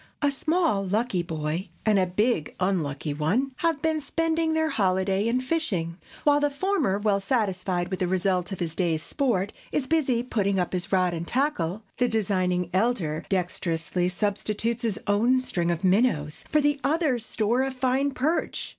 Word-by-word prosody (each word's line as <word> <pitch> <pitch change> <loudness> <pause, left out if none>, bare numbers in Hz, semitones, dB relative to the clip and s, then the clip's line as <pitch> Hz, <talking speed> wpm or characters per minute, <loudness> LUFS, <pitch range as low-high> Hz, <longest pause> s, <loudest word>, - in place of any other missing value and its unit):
A 285 - +4
small 310 - +1
(lucky) 200 0 0
boy 160 +2 -3 0.2
and 190 -4 +2
big 210 -7 +1
(unlucky) 155 -6 -1
one 195 - 0
have 325 -3 0
been 315 -1 +1
spending 325 +2 0
their 315 0 +2
holiday 190 -2 +1
in 245 +2 +1
fishing. 215 - -1 0.3
While 290 -1 +4
the 290 0 +2
former, 285 - 0
well 205 -1 +1
satisfied 190 -5 -1
with 185 - -2
the 180 - +1
result 185 0 0
of 195 - -5
his 165 -3 -2
day's 165 -3 0
sport, 215 - 0 0.2
is 285 - 0
busy 260 -6 +1
putting 200 -5 0
up 180 - -1
his 180 +1 -3
rod 185 -2 +2
and 170 0 -4
tackle, 220 - -1
the 250 - +3
designing 185 -5 0
elder 185 -7 0
dexterously 180 -1 -1
substitutes 210 +4 -1
his 225 -4 -1
own 230 +6 +3
string 175 -9 -1
of 170 +2 -1
minnows 185 -7 +1
for 305 - +3
the 290 -1 +1
other's 280 -5 +1
store 225 +2 0
of 265 0 -2
fine 260 +2 +1
perch. 285 +5 -1
205 Hz, 165 wpm, -26 LUFS, 180-260 Hz, 0.3 s, A